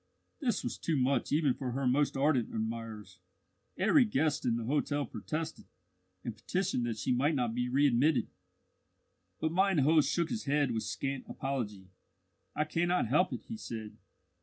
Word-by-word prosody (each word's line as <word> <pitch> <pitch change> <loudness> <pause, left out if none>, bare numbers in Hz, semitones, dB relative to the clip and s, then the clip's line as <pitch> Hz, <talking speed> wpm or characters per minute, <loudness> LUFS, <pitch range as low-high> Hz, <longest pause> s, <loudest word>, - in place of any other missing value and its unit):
This 255 -7 0
was - - -4
too 160 -3 0
much 135 +1 +1
even 145 -3 +3
for 125 -2 -4
her 135 +1 -1
most 135 +3 +2
ardent 135 -4 +2
admirers. 110 -3 -5 0.6
Every 215 +9 +5
guest 150 - 0
in 115 - +2
the 115 - -2
hotel 145 +3 0
protested, 160 +1 -5 0.6
and 115 - -4
petitioned 125 - -1
that 115 -2 -3
she 110 - -1
might 140 +5 +2
not 120 -4 0
be 125 +1 -1
readmitted. 135 0 +3 1.1
But 160 - 0
mine 190 +1 +3
host 150 +2 +4
shook 170 -2 0
his 225 -2 -3
head 145 -2 +2
with 110 -1 -1
scant 135 +5 -3
apology. 110 -8 -4 0.7
"I 150 - +2
cannot 175 -3 0
help 180 +8 +3
it," - - -5
he 225 - -7
said. 110 - -7
140 Hz, 160 wpm, -32 LUFS, 120-160 Hz, 1.1 s, Every